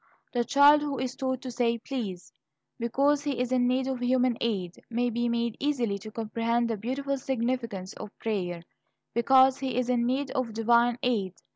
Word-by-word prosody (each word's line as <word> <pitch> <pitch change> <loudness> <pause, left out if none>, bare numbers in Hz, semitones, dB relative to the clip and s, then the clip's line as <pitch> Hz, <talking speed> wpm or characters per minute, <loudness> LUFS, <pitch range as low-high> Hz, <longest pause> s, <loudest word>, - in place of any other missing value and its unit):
The 240 -1 +1
child 285 +4 +6
who 290 -2 -2
is 255 0 -3
taught 260 -2 -2
to 255 - -5
say 235 -1 +1
"please" 220 -8 -6 0.5
because 275 +5 +2
he 285 -4 -2
is 250 0 -1
in 250 -1 +3
need 255 +1 +1
of 265 -1 -2
human 250 0 +2
aid, 190 -7 -2
may 240 +1 0
be 240 +1 0
made 235 -1 -1
easily 245 -8 0
to 215 - -9
comprehend 230 +2 -1
the - - 0
beautiful 270 +6 -3
significance 235 -7 -2
of 215 - -8
prayer, 180 -6 -3 0.5
because 260 +2 +5
he 265 -2 -2
is 250 -1 0
in 240 -1 +2
need 270 +3 -1
of 255 -5 -2
divine 235 +2 +3
aid. 200 -7 0
245 Hz, 180 wpm, -28 LUFS, 230-260 Hz, 0.5 s, child